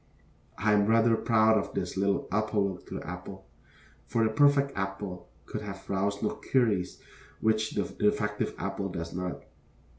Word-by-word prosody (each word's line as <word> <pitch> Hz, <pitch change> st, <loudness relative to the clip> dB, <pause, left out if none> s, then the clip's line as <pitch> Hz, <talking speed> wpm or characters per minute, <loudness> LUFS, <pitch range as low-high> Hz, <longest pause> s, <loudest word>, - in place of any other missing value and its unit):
I 110 Hz, -1 st, +2 dB
am 105 Hz, 0 st, +4 dB
rather 115 Hz, +1 st, +5 dB
proud 110 Hz, -1 st, +4 dB
of -, -, -6 dB
this -, -, -2 dB
little 100 Hz, +1 st, +1 dB
apologue 105 Hz, -3 st, 0 dB
of -, -, -21 dB, 0.2 s
the -, -, -10 dB
apple. 90 Hz, +2 st, -7 dB, 0.6 s
For 115 Hz, -, +1 dB
the 110 Hz, -, +2 dB
perfect 140 Hz, +2 st, +4 dB
apple 95 Hz, -2 st, -4 dB, 0.2 s
could -, -, -5 dB
have 100 Hz, -2 st, -8 dB
roused 100 Hz, +1 st, -1 dB
no 105 Hz, -, +2 dB, 0.2 s
queries 110 Hz, -9 st, +2 dB, 0.4 s
which 110 Hz, 0 st, +1 dB
the 100 Hz, -, +1 dB
defective 105 Hz, +2 st, 0 dB
apple 100 Hz, 0 st, -3 dB
does 85 Hz, -2 st, -5 dB
not. 90 Hz, 0 st, -4 dB
105 Hz, 155 wpm, -29 LUFS, 95-110 Hz, 0.6 s, rather